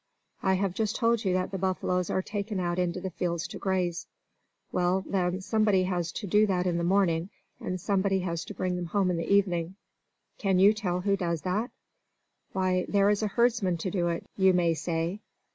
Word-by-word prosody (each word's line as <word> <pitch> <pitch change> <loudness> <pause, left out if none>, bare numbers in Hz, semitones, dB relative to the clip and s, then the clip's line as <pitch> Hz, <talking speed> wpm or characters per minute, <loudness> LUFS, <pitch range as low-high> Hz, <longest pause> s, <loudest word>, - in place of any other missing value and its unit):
I 190 -1 +2
have 190 -1 0
just 215 +2 -1
told 230 -2 +2
you 190 -3 +1
that 185 +1 -1
the 195 - -3
buffaloes 180 -1 0
are 190 - 0
taken 205 0 -3
out 175 0 -1
into 180 0 0
the 190 0 -5
fields 170 0 -2
to - - -7
graze. 185 -3 -1 0.6
Well, 180 +1 +1
then, 185 -1 0
somebody 210 -2 +2
has 175 -2 -1
to 210 - -5
do 210 +3 +4
that 180 -2 0
in 175 -2 0
the - - -1
morning, 175 -2 +2 0.3
and 185 0 -4
somebody 195 0 +1
has 170 -2 -3
to - - -8
bring 180 -1 -1
them 175 -1 -4
home 190 +1 +1
in 175 - -1
the 165 - -3
evening. 185 -3 +2 0.6
Can 195 -3 +2
you 200 +3 +6
tell 180 -4 -2
who 200 +1 +2
does 170 -4 -2
that? 205 +7 -1 0.8
Why, 185 -1 0
there 200 0 +4
is 210 - 0
a 215 - +1
herdsman 220 -5 +1
to 180 +3 -3
do 175 -2 0
it, 170 0 -2
you 190 -1 +4
may 170 -2 +3
say. 165 +4 -2
185 Hz, 205 wpm, -28 LUFS, 175-200 Hz, 0.8 s, you